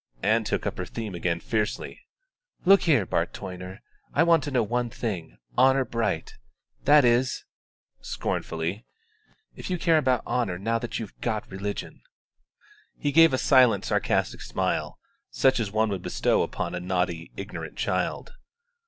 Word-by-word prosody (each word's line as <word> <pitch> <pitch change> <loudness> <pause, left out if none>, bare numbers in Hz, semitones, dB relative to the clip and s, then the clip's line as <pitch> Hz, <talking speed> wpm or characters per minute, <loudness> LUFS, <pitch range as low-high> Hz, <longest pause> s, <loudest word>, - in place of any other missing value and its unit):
Ann - - +3
took - - -2
up - - -3
her - - -2
theme 110 -4 -6
again 85 -1 -1
fiercely. 105 +4 -3 0.6
"Look 195 +2 +7
here, 140 - +3
Bart - - -1
Toyner; 90 0 -8 0.3
I 160 - +5
want 165 -2 +4
to - - -3
know 125 -4 +2
one 120 +2 -1
thing, 100 -8 -5 0.2
honour 130 +1 +4
bright 115 -1 -2 0.5
that 145 -2 +7
is," 120 +2 +2 0.5
scornfully, 85 +7 -3 0.7
"if - - -7
you 180 - 0
care 165 -2 +3
about 130 -5 +1
honour 115 -8 -1
now 115 +5 0
that 120 - -4
you've 110 -4 -6
got 110 -4 -2
religion." 100 +2 -5 1.0
He 145 - -1
gave 165 +2 +7
a 130 - +1
silent 130 -3 +4
sarcastic - - 0
smile, - - -2 0.3
such 130 -1 +2
as 105 -4 -2
one 110 +1 +2
would 95 -3 -3
bestow - - +1
upon 85 - -3
a 90 - -2
naughty, 90 -2 -2
ignorant - - -7
child. - - -2
115 Hz, 155 wpm, -26 LUFS, 95-130 Hz, 1.0 s, Look